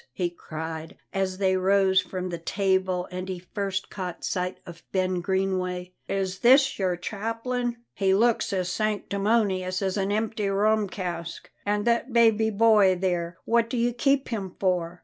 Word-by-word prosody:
he 175 +3 -1
cried, 160 -1 -7 0.2
as 190 -1 -1
they 190 -1 +2
rose 190 0 +4
from 185 0 -5
the 170 -1 -4
table 190 0 0
and 185 +1 -5
he 185 - -3
first 190 +1 -4
caught 180 -3 -5
sight 180 0 -2
of 170 -2 -11
Ben 185 -1 0
Greenway. 185 -1 -1
"Is 190 -1 -2
this 265 +1 +5
your 185 -2 +1
chaplain? 230 +6 -3 0.2
He 190 -1 +2
looks 230 +3 +2
as 185 -2 -1
sanctimonious 200 -2 0
as 190 0 -1
an 195 0 0
empty 215 -1 -1
rum 210 +1 +2
cask. 170 -3 -5 0.2
And 205 +1 +1
that 235 +2 +1
baby 225 -2 +4
boy 210 -3 +5
there, 175 -2 -2
what 230 0 +2
do 245 - -2
you 240 +1 +1
keep 275 +3 +1
him 200 -6 -4
for? 180 -2 0
190 Hz, 160 wpm, -26 LUFS, 180-215 Hz, 0.2 s, this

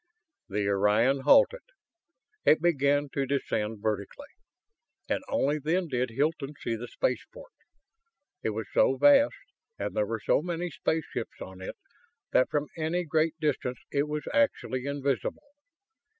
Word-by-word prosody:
The 100 0 -1
Orion 105 +7 +3
halted. 280 - +5 0.8
It 155 - +5
began 145 -3 +2
to 135 -1 -1
descend 110 -6 -2
vertically, 110 - -3 0.8
and - - -1
only 150 - +1
then 165 +4 0
did 125 -1 0
Hilton 145 +3 -1
see 115 - -2
the 120 +2 -6
spaceport. - - -3 0.9
It - - -1
was 110 0 -3
so 135 - +4
vast, 285 - +6 0.4
and - - -4
there 105 - +1
were 115 0 -3
so - - +3
many 175 +1 -3
spaceships 160 -1 -3
on 95 0 -9
it, 95 - -6 0.5
that 130 - +4
from 150 -1 -1
any 165 +2 -1
great 160 0 +1
distance 135 -5 -1
it 140 +1 +1
was 150 0 -4
actually 140 - +1
invisible! 140 - -2
140 Hz, 135 wpm, -28 LUFS, 120-165 Hz, 0.9 s, vast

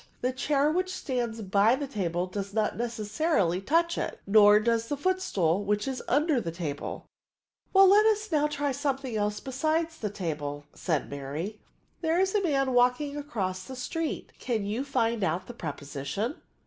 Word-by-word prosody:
The 250 - +1
chair 285 +2 +2
which 370 +3 0
stands 240 -9 -3
by 200 +5 +4
the 285 +1 -3
table 180 -9 -2
does 200 +2 -5
not 215 -1 +1
necessarily 215 - 0
touch 335 - +1
it; - - -3
nor 210 0 +7
does 230 +1 +1
the 290 - -2
footstool, 205 - +1
which 210 +3 0
is 265 -1 -3
under 290 -1 +2
the 170 - -3
table." 160 -4 -5 0.7
"Well, 390 0 +7
now 380 - +6
let 420 +1 +6
us 435 0 +2 0.2
try 290 -1 -1
something 270 -3 -2
else 210 0 0
besides 315 +5 -1
the 210 - -2
table," 150 -7 -4
said 160 -6 -1
Mary. 145 +9 -5 0.2
" - - -41
There 330 +1 +2
is 380 0 +2
a 415 - +2
man 275 -7 +1
walking 250 +4 +2
across 200 -11 -3
the 265 - -8
street; 320 +6 -3
can 225 -5 -1
you 215 +6 -2
find 235 -5 0
out 175 +2 0
the 245 - -8
preposition?" 150 - -4
235 Hz, 175 wpm, -28 LUFS, 195-290 Hz, 0.7 s, nor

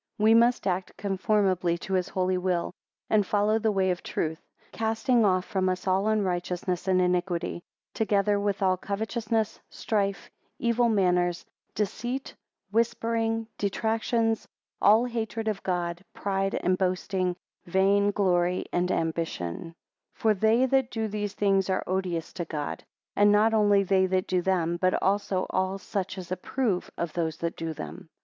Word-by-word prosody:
8 - - -1
We 220 +1 +6
must 235 +2 +4
act 185 -1 -2
conformably 190 -3 +1
to 190 +2 -6
his 185 -1 +1
holy 185 0 0
will; 180 -1 -1 0.3
and 215 -1 +3
follow 210 +2 +1
the 220 -1 +1
way 190 -2 +2
of 180 - -3
truth, 160 0 -3 0.3
casting 225 +2 +1
off 185 -2 +2
from 190 -3 0
us 185 0 -3
all 190 +2 +2
unrighteousness 180 -3 -1
and 185 -1 +3
iniquity, 180 -1 0 0.3
together 205 -2 +1
with 200 -1 -1
all 185 -1 +3
covetousness, 220 +2 -2
strife, 200 -2 -2 0.3
evil 235 0 +2
manners, 180 -4 +1 0.3
deceit, 240 +6 -3 0.4
whispering, 225 0 0
detractions; 225 +2 0 0.3
all 220 +4 +6
hatred 225 -2 -3
of 210 -3 -1
God, 175 -1 -2
pride 195 0 -1
and 185 +1 0
boasting; 185 -1 0 0.3
vain 195 +3 +3
glory 180 -3 +1
and 180 +1 +1
ambition; 160 - -2
9 165 - -11 0.4
For 220 -1 +2
they 220 +5 +3
that 265 -1 +2
do 225 -3 -2
these 205 -1 -3
things 195 -2 +2
are 185 - 0
odious 180 -3 -2
to 175 - -4
God; 150 -2 -4 0.3
and 205 0 +5
not 215 +2 +4
only 205 -2 +4
they 190 0 +3
that 185 0 0
do 185 -1 0
them, 175 -2 0
but 185 +1 +2
also 195 -1 0
all 190 +1 0
such 190 -1 -4
as 180 -1 -8
approve 190 +1 -1
of 170 -2 -3
those 165 -2 -2
that 170 0 -3
do 165 0 -4
them. 155 +1 -8
195 Hz, 155 wpm, -27 LUFS, 180-215 Hz, 0.4 s, We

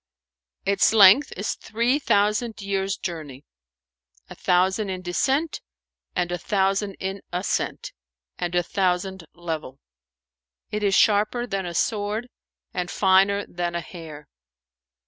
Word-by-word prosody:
"Its 200 +2 +3
length 215 +7 +7
is 200 - -1
three 235 +6 0
thousand 210 -1 +1
years' 195 -1 -1
journey, 150 -6 -6 0.9
a - - -7
thousand 190 +3 +1
in 185 -1 -4
descent 270 - 0 0.5
and 175 -1 0
a 175 - -2
thousand 195 +1 0
in 190 +1 -5
ascent 180 +2 -2 0.5
and 175 0 -2
a 175 - +3
thousand 190 -1 -1
level: 160 -6 -5 0.9
it 210 0 -2
is 200 -2 +2
sharper 215 +4 +3
than 195 -5 -3
a 170 - -6
sword 215 +5 -1 0.4
and 180 0 -2
finer 195 +2 +3
than 175 0 -3
a - - 0
hair." 155 -3 -10
195 Hz, 125 wpm, -24 LUFS, 175-210 Hz, 0.9 s, length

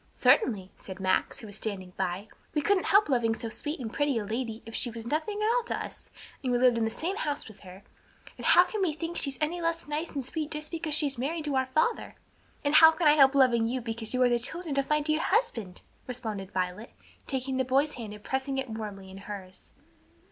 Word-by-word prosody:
"Certainly," 200 - +3
said 190 0 -10
Max, 190 0 +1
who - - -9
was 205 -2 -7
standing 190 -5 -4
by; 190 +2 -2 0.3
"we 300 - +2
couldn't 400 +1 +2
help 405 +2 +5
loving 235 -5 +1
so 230 - -6
sweet 295 +7 -4
and 225 -4 -5
pretty 290 -4 +1
a 215 - -2
lady 225 +1 -4
if 225 - -10
she 245 - 0
was 230 -1 -7
nothing 315 - -2
at - - +2
all - - +1
to - - -2
us - - -8 0.3
and 255 - -1
we 245 - +3
lived 250 -1 +4
in 230 -1 +1
the - - 0
same 350 - -3
house 295 -10 -2
with 215 -2 -13
her, 185 0 -13 0.5
and - - -4
how 350 - +8
can 420 +2 -4
we 350 -5 +1
think 330 +2 -5
she's 275 -4 0
any 325 +3 -1
less 335 -1 -2
nice 300 +3 -2
and 275 -4 -3
sweet 305 +2 -3
just 300 -1 -4
because 320 -3 +1
she's 285 -5 +2
married 305 +4 -2
to 290 -2 -1
our 260 0 +1
father?" 310 - 0 0.5
"And 285 - +2
how 320 +1 +10
can 320 -1 +1
I 295 - +8
help 275 -2 +6
loving 240 -4 +4
you 255 +2 -1
because 225 -2 -3
you 255 0 +2
are 250 - +5
the 240 0 +2
children 310 +3 -2
of 275 - -2
my 300 0 +3
dear 310 +1 +1
husband?" 320 - -1 0.2
responded 220 -6 -4
Violet, 185 +4 -3 0.3
taking 265 -1 -2
the 260 - +2
boy's 275 +4 +2
hand 225 -4 -7
and 210 0 -11
pressing 265 +1 -2
it 265 -3 -3
warmly 205 -3 -7
in 190 - -10
hers. 195 -2 -9
260 Hz, 235 wpm, -28 LUFS, 220-305 Hz, 0.5 s, how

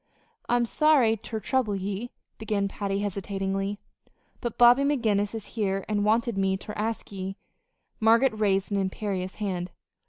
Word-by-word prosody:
"I'm 240 0 +3
sorry 270 -4 +4
ter 220 +1 -6
trouble 220 -1 0
ye," 200 +4 -3 0.3
began 210 -2 0
Patty, 200 0 -2
hesitatingly, 195 0 -2 0.6
"but 240 -3 -4
Bobby 245 +2 +7
McGinnis 225 -7 +1
is 220 -2 -5
here 195 -3 -1
an' 210 -1 0
wanted 225 0 +1
me 190 0 +1
ter 210 +2 -8
ask 220 +1 -3
ye 195 0 -5 0.3
" - - -51 0.3
Margaret 230 +3 +4
raised 200 -2 +1
an 200 - +1
imperious 190 -1 -3
hand. 185 -4 -3
205 Hz, 150 wpm, -27 LUFS, 195-230 Hz, 0.6 s, Bobby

